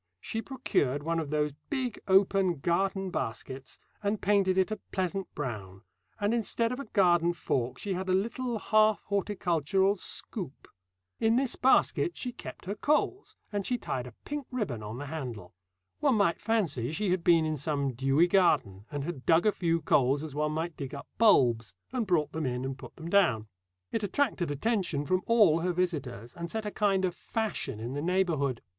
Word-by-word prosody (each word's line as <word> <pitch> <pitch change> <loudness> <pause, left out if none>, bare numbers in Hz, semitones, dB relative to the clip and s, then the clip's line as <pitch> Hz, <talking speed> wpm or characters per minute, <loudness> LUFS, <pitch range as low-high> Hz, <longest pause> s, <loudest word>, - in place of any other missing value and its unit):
She 225 - -3
procured 145 - -1
one 165 +1 0
of 155 -3 -4
those 150 0 +1 0.2
big 260 -6 -2
open 190 -1 +4
garden 190 +5 0
baskets 130 +1 -5 0.2
and 205 0 0
painted 195 -2 +2
it 190 +3 +2
a 215 - -3
pleasant 190 0 -2
brown, 100 -9 -5 0.4
and 205 +2 +1
instead 230 0 +1
of 250 - -4
a 280 - -5
garden 175 -5 +3
fork 125 -6 -2
she 200 - -3
had 185 +1 -3
a - - +3
little 235 +5 -1
half 215 0 +3
horticultural 195 -1 +1
scoop. 180 - -5 0.5
In 225 +1 +3
this 260 0 +1
basket 265 +6 +3
she 250 - -3
kept - - -10
her 195 - -2
coals, 300 - 0 0.2
and 205 -1 -1
she 245 +5 0
tied 125 - -4
a 120 - -12
pink 290 -3 -4
ribbon 205 - -3
on 105 +2 -6
the 145 - -5
handle. 125 - -6 0.5
One 280 -4 +3
might 200 -5 +2
fancy 170 - 0
she 195 +3 -1
had 180 -2 0
been 165 -2 +5
in 155 0 -1
some 140 -2 -1
dewy 135 +6 +3
garden 170 - +2
and 145 -2 -4
had 150 -4 -6
dug 165 +3 +5
a 215 - +5
few 165 -4 0
coals 140 +1 +3
as 155 -3 -6
one 150 +1 0
might 160 +1 -3
dig 140 0 -6
up 140 - -8
bulbs, 120 - +4 0.2
and 240 -5 -1
brought 155 -5 +2
them 160 -3 -2
in 125 +1 -2
and 135 0 -3
put 130 - -12
them 165 - -8
down. 125 - +3 0.4
It 225 - -1
attracted 205 - 0
attention 170 - -1
from 185 +4 +1
all 210 -9 +5
her 180 +1 0
visitors, 145 - -2
and 170 0 -6
set 220 +3 -3
a 210 - -2
kind 195 -3 +2
of 180 - -1
fashion 195 - -3
in 120 +3 -4
the 145 - -2
neighbourhood. 165 -8 0
175 Hz, 190 wpm, -29 LUFS, 140-205 Hz, 0.5 s, been